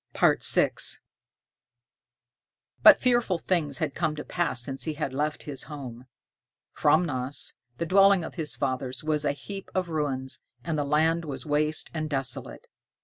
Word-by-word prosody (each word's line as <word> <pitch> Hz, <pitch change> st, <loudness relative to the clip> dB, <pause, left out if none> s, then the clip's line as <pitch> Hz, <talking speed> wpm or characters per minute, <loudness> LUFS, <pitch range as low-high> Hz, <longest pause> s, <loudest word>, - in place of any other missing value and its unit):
VI -, -, +4 dB, 2.1 s
But -, -, +9 dB
fearful 240 Hz, -7 st, +2 dB
things 160 Hz, -5 st, 0 dB
had 155 Hz, -4 st, -2 dB
come 160 Hz, -2 st, -1 dB
to 150 Hz, -, -5 dB
pass 170 Hz, -7 st, -1 dB
since 135 Hz, +2 st, -3 dB
he 155 Hz, -2 st, -2 dB
had 145 Hz, -3 st, -3 dB
left 150 Hz, +3 st, -2 dB
his 140 Hz, -3 st, -4 dB
home! 130 Hz, -4 st, -8 dB, 0.7 s
Framnäas, 135 Hz, -5 st, +1 dB, 0.2 s
the 170 Hz, -, -2 dB
dwelling 195 Hz, +1 st, +5 dB
of -, -, -6 dB
his 160 Hz, -4 st, -2 dB
fathers, 130 Hz, -1 st, -3 dB
was 150 Hz, -1 st, 0 dB
a 145 Hz, -, +2 dB
heap 195 Hz, +6 st, -8 dB
of 185 Hz, -2 st, 0 dB
ruins, 135 Hz, -4 st, -2 dB, 0.2 s
and 165 Hz, -, -2 dB
the 150 Hz, -, 0 dB
land 160 Hz, +3 st, +2 dB
was 145 Hz, -2 st, -5 dB
waste 150 Hz, +1 st, 0 dB
and 155 Hz, -1 st, -3 dB
desolate. 135 Hz, -2 st, -3 dB
150 Hz, 145 wpm, -27 LUFS, 135-165 Hz, 2.1 s, But